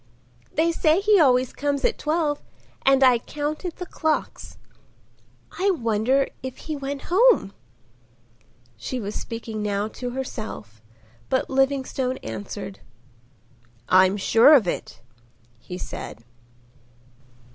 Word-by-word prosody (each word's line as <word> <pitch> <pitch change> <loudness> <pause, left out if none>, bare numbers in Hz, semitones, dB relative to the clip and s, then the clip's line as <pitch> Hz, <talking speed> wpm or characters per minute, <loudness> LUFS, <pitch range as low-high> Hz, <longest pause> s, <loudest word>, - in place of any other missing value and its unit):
They 330 +2 +2
say 320 +1 +3
he 410 0 +4
always 255 -4 +3
comes 285 -1 -1
at - - +1
twelve 305 -1 0 0.5
and 270 0 +5
I 250 -2 +6
counted 300 +6 -4
the 360 - -6
clocks.—I 335 +4 -5
wonder 250 - +1 0.2
if 260 0 -6
he 310 - -5
went 280 0 -6
home?" 450 - +4 1.2
She 250 - -4
was 205 -2 -5
speaking 225 -1 -5
now 205 0 -1
to 245 +2 -6
herself; 215 - -6 0.5
but 260 - 0
Livingstone 265 -1 0
answered. 110 - -6 1.1
"I'm 185 +2 +5
sure 230 +8 +6
of 230 -10 +3
it," 115 - -4 0.6
he 180 +9 -8
said. 115 - -8
260 Hz, 110 wpm, -24 LUFS, 215-300 Hz, 1.2 s, I